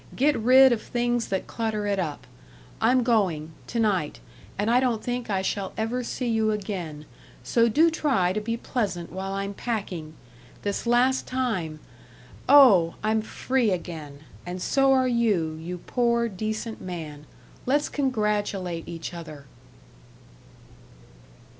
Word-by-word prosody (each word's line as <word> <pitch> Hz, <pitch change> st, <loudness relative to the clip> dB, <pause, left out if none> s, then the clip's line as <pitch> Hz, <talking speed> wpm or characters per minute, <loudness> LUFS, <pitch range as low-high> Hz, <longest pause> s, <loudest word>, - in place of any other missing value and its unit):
Get 290 Hz, +2 st, +3 dB
rid 260 Hz, +3 st, +6 dB
of 230 Hz, -2 st, 0 dB
things 240 Hz, -1 st, -1 dB
that 190 Hz, -1 st, -2 dB
clutter 220 Hz, -2 st, -2 dB
it 200 Hz, -1 st, 0 dB
up. 155 Hz, -5 st, -4 dB, 0.6 s
I'm 245 Hz, +3 st, +4 dB
going, 185 Hz, -10 st, +1 dB, 0.2 s
to 235 Hz, -, -3 dB
night, 190 Hz, -9 st, 0 dB, 0.4 s
and 205 Hz, +2 st, -1 dB
I 245 Hz, -, +5 dB
don't 245 Hz, -4 st, 0 dB
think 245 Hz, -1 st, -3 dB
I 190 Hz, -2 st, 0 dB
shall 195 Hz, 0 st, -2 dB
ever 230 Hz, +3 st, -1 dB
see 245 Hz, +1 st, -3 dB
you 220 Hz, -1 st, +1 dB
again, 185 Hz, -8 st, -4 dB, 0.4 s
so 230 Hz, -, +3 dB
do 320 Hz, +8 st, +4 dB
try 255 Hz, -, +1 dB
to 215 Hz, -, -2 dB
be 230 Hz, +2 st, -2 dB
pleasant 195 Hz, -9 st, -3 dB
while 190 Hz, +1 st, -4 dB
I'm 195 Hz, +1 st, -3 dB
packing. 185 Hz, -9 st, -4 dB, 0.5 s
This 205 Hz, +3 st, -2 dB
last 250 Hz, +2 st, +3 dB
time.... 190 Hz, -13 st, -2 dB, 0.7 s
Oh, 215 Hz, -13 st, +7 dB
I'm 220 Hz, +1 st, +2 dB
free 250 Hz, +2 st, 0 dB
again. 160 Hz, -6 st, -5 dB, 0.2 s
And 180 Hz, +1 st, -6 dB
so 270 Hz, +8 st, +2 dB
are 260 Hz, -1 st, +4 dB
you, 215 Hz, -10 st, +1 dB
you 180 Hz, +2 st, -5 dB
poor, 235 Hz, +4 st, 0 dB
decent 220 Hz, +2 st, -4 dB
man. 155 Hz, -5 st, -7 dB, 0.4 s
Let's 290 Hz, +3 st, +2 dB
congratulate 210 Hz, -, -1 dB
each 165 Hz, 0 st, -6 dB
other." 155 Hz, -4 st, -9 dB
215 Hz, 140 wpm, -25 LUFS, 180-240 Hz, 0.7 s, Oh